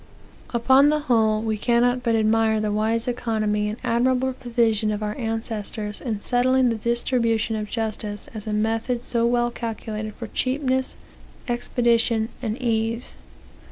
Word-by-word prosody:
"Upon 260 Hz, +4 st, +5 dB
the 300 Hz, -, +2 dB
whole, 220 Hz, -5 st, +2 dB
we 220 Hz, -2 st, -1 dB
cannot 245 Hz, +2 st, +2 dB
but 230 Hz, -2 st, +1 dB
admire 220 Hz, 0 st, +2 dB
the 215 Hz, -1 st, -1 dB
wise 220 Hz, +3 st, 0 dB
economy 215 Hz, -4 st, 0 dB
and 215 Hz, -, -5 dB
admirable 255 Hz, +2 st, +1 dB
provision 230 Hz, -4 st, +1 dB
of 210 Hz, 0 st, -2 dB
our 210 Hz, 0 st, -2 dB
ancestors 220 Hz, -2 st, -4 dB
in 220 Hz, -5 st, -3 dB
settling 255 Hz, +1 st, +3 dB
the 230 Hz, -, 0 dB
distribution 230 Hz, -1 st, 0 dB
of 210 Hz, -1 st, -4 dB
justice 215 Hz, -2 st, -4 dB
in 215 Hz, -, -5 dB
a -, -, -1 dB
method 225 Hz, +3 st, -1 dB
so 235 Hz, -1 st, +1 dB
well 240 Hz, 0 st, +1 dB
calculated 220 Hz, -2 st, -5 dB
for 235 Hz, -, -6 dB
cheapness, 260 Hz, +3 st, -1 dB, 0.5 s
expedition, 235 Hz, -2 st, +1 dB
and 230 Hz, 0 st, -3 dB
ease. 230 Hz, -1 st, -1 dB
230 Hz, 145 wpm, -23 LUFS, 215-245 Hz, 0.5 s, Upon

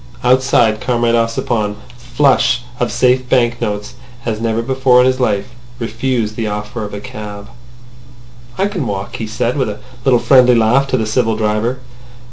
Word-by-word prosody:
Outside, 125 Hz, -3 st, +3 dB
Comrade 120 Hz, -2 st, +1 dB
Ossipon, 115 Hz, -2 st, 0 dB, 0.2 s
flush 125 Hz, 0 st, +1 dB, 0.2 s
of 120 Hz, -2 st, 0 dB
safe 125 Hz, +1 st, +2 dB
banknotes 120 Hz, -5 st, 0 dB, 0.3 s
as 110 Hz, -2 st, -2 dB
never 115 Hz, 0 st, -1 dB
before 130 Hz, 0 st, +3 dB
in -, -, +3 dB
his 130 Hz, 0 st, +1 dB
life, 115 Hz, -3 st, 0 dB, 0.3 s
refused 115 Hz, -1 st, -2 dB
the 115 Hz, -1 st, -2 dB
offer 105 Hz, +2 st, -4 dB
of 105 Hz, 0 st, -6 dB
a -, -, -5 dB
cab. 105 Hz, 0 st, -8 dB, 1.1 s
"I 195 Hz, -, +1 dB
can 190 Hz, -, -3 dB
walk," 100 Hz, -1 st, -4 dB
he 110 Hz, -, -4 dB
said, 120 Hz, +4 st, -2 dB
with 130 Hz, -, 0 dB
a 105 Hz, -, -6 dB, 0.2 s
little 130 Hz, -2 st, +4 dB
friendly 125 Hz, -2 st, +5 dB
laugh 120 Hz, +5 st, +3 dB
to 130 Hz, -, 0 dB
the 110 Hz, -, -1 dB
civil 110 Hz, 0 st, 0 dB
driver. 110 Hz, +4 st, -1 dB
120 Hz, 160 wpm, -16 LUFS, 110-125 Hz, 1.1 s, friendly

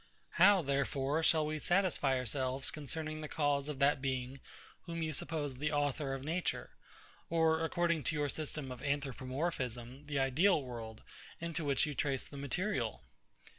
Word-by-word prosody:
How, 200 Hz, -4 st, +7 dB
therefore, 140 Hz, +1 st, +1 dB
shall 160 Hz, -1 st, +4 dB
we 155 Hz, 0 st, -2 dB
satisfy 175 Hz, -6 st, +2 dB
ourselves 130 Hz, +1 st, -1 dB
concerning 155 Hz, +1 st, -4 dB
the 155 Hz, -, -4 dB
cause 145 Hz, -1 st, +1 dB
of 150 Hz, -, -3 dB
that 140 Hz, 0 st, +3 dB
Being 130 Hz, 0 st, -2 dB, 0.5 s
whom 165 Hz, -1 st, -3 dB
you 155 Hz, -1 st, -1 dB
suppose 145 Hz, -1 st, -2 dB
the 150 Hz, +4 st, -2 dB
Author 145 Hz, -1 st, 0 dB
of 135 Hz, -, -7 dB
Nature, 170 Hz, +5 st, -1 dB, 0.6 s
or, 160 Hz, -1 st, +3 dB
according 170 Hz, 0 st, +1 dB
to 155 Hz, -, +2 dB
your 145 Hz, -1 st, +1 dB
system 150 Hz, -2 st, -4 dB
of 125 Hz, -, -7 dB
Anthropomorphism, 135 Hz, -2 st, -2 dB
the 145 Hz, -2 st, -2 dB
ideal 150 Hz, +8 st, +4 dB
world, 115 Hz, -3 st, -7 dB, 0.4 s
into 170 Hz, -1 st, -3 dB
which 140 Hz, 0 st, +2 dB
you 150 Hz, -, -3 dB
trace 135 Hz, -2 st, -1 dB
the -, -, -12 dB
material? 140 Hz, -, -1 dB
145 Hz, 155 wpm, -34 LUFS, 135-160 Hz, 0.6 s, How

